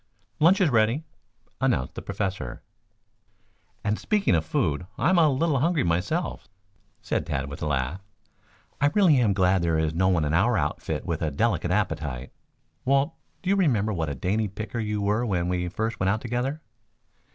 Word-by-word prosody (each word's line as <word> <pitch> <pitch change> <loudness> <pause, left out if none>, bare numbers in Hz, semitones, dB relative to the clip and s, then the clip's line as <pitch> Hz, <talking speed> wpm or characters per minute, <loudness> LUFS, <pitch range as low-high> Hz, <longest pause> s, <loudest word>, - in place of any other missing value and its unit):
"Lunch 175 +6 +5
is 180 -7 +3
ready," 115 +6 +2 0.6
announced 65 - +1
the - - -6
Professor. 95 - -4 1.2
"And 105 +1 0
speaking 210 -2 +1
of 80 -2 +2
food, 80 +1 -1
I'm 180 0 +3
a 160 -2 +5
little 140 +1 +1
hungry 165 +2 +2
myself," 90 - -1 0.6
said - - -1
Tad 70 +1 -3
with - - -8
a 80 - -1
laugh. 70 +5 -1 0.8
"I 145 - +5
really 185 -9 +5
am 110 -5 +3
glad 95 -1 +3
there 85 -1 +1
is 80 0 0
no 95 +3 +2
one 90 -5 +2
in 75 - -1
our 105 +7 +3
outfit 75 -3 -2
with 85 -1 -2
a 80 - +1
delicate 90 +4 0
appetite. 65 -4 -2 0.5
Walt, 140 +4 +2 0.3
do 190 - +1
you - - +4
remember 115 - +2
what 80 -4 -2
a 70 - -3
dainty 105 - 0
picker 110 +4 -5
you 105 -2 -2
were 105 +4 +1
when 90 -7 0
we 90 -1 -1
first 110 +4 -3
went 95 - +1
out 110 +3 0
together?" 125 +6 -2
100 Hz, 175 wpm, -26 LUFS, 85-135 Hz, 1.2 s, Lunch